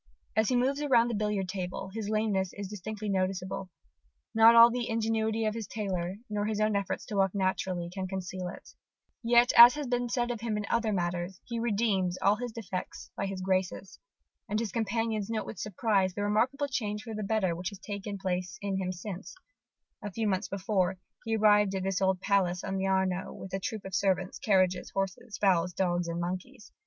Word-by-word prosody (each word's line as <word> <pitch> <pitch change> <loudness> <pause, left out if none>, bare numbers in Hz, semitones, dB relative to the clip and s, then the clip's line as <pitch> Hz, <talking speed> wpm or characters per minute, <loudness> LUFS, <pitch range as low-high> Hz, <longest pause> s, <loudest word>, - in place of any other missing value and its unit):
As 220 0 +3
he 255 - +2
moves 270 +4 +1
around 240 -5 +4
the - - -2
billiard 210 -2 -1
table, 185 0 -4
his 215 -2 -4
lameness 215 -4 0
is 200 -1 -6
distinctly 210 +2 -6
noticeable: 190 -1 -2 0.6
not 225 +1 +7
all 235 +1 +9
the 245 0 -2
ingenuity 225 0 0
of 215 - +1
his 225 -3 -5
tailor, 190 -4 -3
nor 210 -1 -2
his 215 -1 -1
own 215 -1 +2
efforts 200 -1 -2
to 210 - -6
walk 195 0 +2
naturally, 185 -2 -1
can 185 +1 -5
conceal 185 -1 -4
it. 180 - -10 0.5
Yet, 240 +1 +5
as 240 +1 +11
has 300 -1 -3
been 245 -1 -1
said 240 0 0
of 235 -3 -5
him 225 -2 -1
in 210 - -3
other 230 -2 +1
matters, 175 -1 -2
he 235 -1 -4
redeems 200 -5 +1
all 200 +2 +3
his 245 0 -4
defects 195 -5 -6
by 200 - -2
his 195 -1 -5
graces. 185 +1 -2 0.5
And 210 - 0
his 225 -3 -2
companions 225 -1 -1
note 225 -1 -2
with 215 - -8
surprise 200 -2 0
the 205 - -2
remarkable 245 +8 +1
change 210 -5 -3
for 225 - -7
the 215 - -4
better 195 -4 0
which 180 +2 -3
has 200 - -10
taken 200 +1 -5
place 180 -1 -3
in 200 -1 -2
him 185 -1 -2
since, 185 - -7 0.7
a 205 - -4
few 220 +3 -1
months 195 +1 0
before, 190 -1 0 0.3
he 225 0 0
arrived 210 -2 +4
at 190 - -2
this 190 -1 -1
old 190 -1 +2
palace 185 -3 +1
on 195 - -2
the 190 0 0
Arno 190 -1 0
with 190 - -9
a 195 - 0
troop 215 +1 -5
of 190 - -7
servants, 190 -1 0
carriages, 185 -3 +2
horses, 195 +2 -4
fowls, 180 -3 +2
dogs, 175 -2 0
and 170 0 -3
monkeys. 185 +7 -5
200 Hz, 200 wpm, -29 LUFS, 185-220 Hz, 0.7 s, as